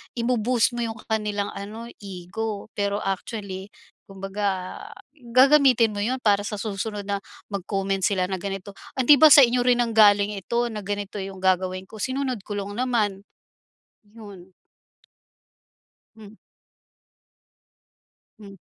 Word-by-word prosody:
ibo-boost 235 Hz, -1 st, +1 dB
mo -, -, -4 dB
iyung 225 Hz, -1 st, -4 dB
kanilang 210 Hz, -2 st, -2 dB
ano, 215 Hz, +4 st, -7 dB, 0.2 s
ego. 200 Hz, +3 st, -6 dB
Pero 200 Hz, 0 st, -1 dB
actually, 195 Hz, 0 st, -4 dB, 0.4 s
kumbaga 195 Hz, -1 st, -4 dB, 0.4 s
gagamitin 255 Hz, -2 st, +4 dB
mo 205 Hz, -, -5 dB
iyun 255 Hz, +3 st, -1 dB
para 205 Hz, -1 st, +3 dB
sa 210 Hz, -, -4 dB
susunod 205 Hz, 0 st, -4 dB
na 200 Hz, 0 st, -1 dB, 0.3 s
mag-comment 195 Hz, 0 st, -2 dB
sila 185 Hz, -2 st, +1 dB
na 190 Hz, -, -2 dB
ganito, 195 Hz, 0 st, -5 dB, 0.2 s
"Hindi 265 Hz, +2 st, +6 dB
ba 315 Hz, -, +9 dB
sa 285 Hz, -3 st, +10 dB
inyo 245 Hz, +1 st, +3 dB
rin 245 Hz, -1 st, +3 dB
nanggaling 210 Hz, -2 st, +4 dB
ito, 235 Hz, +5 st, -1 dB
na 215 Hz, -, -5 dB
ganito 205 Hz, 0 st, -4 dB
iyung 190 Hz, -1 st, -7 dB
gagawin 185 Hz, 0 st, +1 dB
ko. 220 Hz, -, -12 dB
Sinunod 260 Hz, -5 st, -2 dB
ko 205 Hz, -1 st, -4 dB
lang 200 Hz, +1 st, -6 dB
naman." 220 Hz, -6 st, -1 dB, 0.9 s
ayon. 190 Hz, -4 st, -12 dB, 1.6 s
Hmm 215 Hz, -1 st, -13 dB, 2.1 s
Hmm. 200 Hz, -2 st, -12 dB
205 Hz, 125 wpm, -24 LUFS, 195-235 Hz, 2.1 s, sa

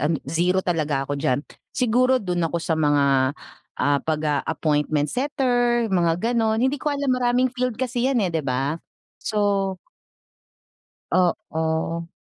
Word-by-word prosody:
an 155 Hz, +4 st, +1 dB
zero 175 Hz, +6 st, +1 dB
talaga 150 Hz, -6 st, 0 dB
ako 145 Hz, 0 st, -4 dB
diyan. 140 Hz, -1 st, 0 dB, 0.2 s
Siguro 255 Hz, +1 st, +2 dB
dun 180 Hz, -7 st, -2 dB
ako 170 Hz, -, -3 dB
sa 165 Hz, 0 st, -1 dB
mga 145 Hz, -2 st, +2 dB, 0.8 s
ah, 145 Hz, -1 st, +2 dB
pag 155 Hz, -1 st, -2 dB
ah, 145 Hz, -1 st, +1 dB
appointment 150 Hz, -2 st, 0 dB
setter, 245 Hz, -3 st, +1 dB
mga 175 Hz, +6 st, +1 dB
ganon 220 Hz, -2 st, +1 dB
hindi 265 Hz, +1 st, 0 dB
ko 300 Hz, -, -1 dB
alam 280 Hz, -2 st, 0 dB
maraming 250 Hz, 0 st, +1 dB
field 250 Hz, -3 st, -2 dB
kasi 250 Hz, 0 st, -1 dB
'yan 245 Hz, -7 st, +1 dB
eh, 175 Hz, -, -2 dB
'di 160 Hz, -, 0 dB
ba? 135 Hz, +4 st, -2 dB, 0.4 s
So 200 Hz, -3 st, 0 dB, 1.4 s
Oo. 165 Hz, -2 st, 0 dB
180 Hz, 145 wpm, -23 LUFS, 155-245 Hz, 1.4 s, Siguro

